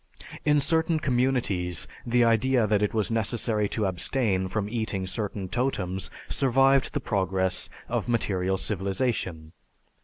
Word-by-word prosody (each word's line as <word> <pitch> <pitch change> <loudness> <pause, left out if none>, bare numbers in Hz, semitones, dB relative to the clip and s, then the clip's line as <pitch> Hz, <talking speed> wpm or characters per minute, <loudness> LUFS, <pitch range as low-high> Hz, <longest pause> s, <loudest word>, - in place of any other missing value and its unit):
In 150 -1 +4
certain 160 +2 +1
communities 120 - 0 0.2
the 120 +1 +3
idea 115 +1 +3
that 105 -1 +2
it 105 - +1
was 110 -1 -1
necessary 110 -1 0
to 110 - -1
abstain 95 +1 0
from 100 +2 -2
eating 105 -4 -2
certain 100 0 -3
totems 95 -5 -2 0.2
survived 135 0 +3
the - - 0
progress 95 -2 0 0.2
of - - -2
material 95 -5 0
civilization. 95 -5 -2
105 Hz, 125 wpm, -26 LUFS, 95-125 Hz, 0.2 s, In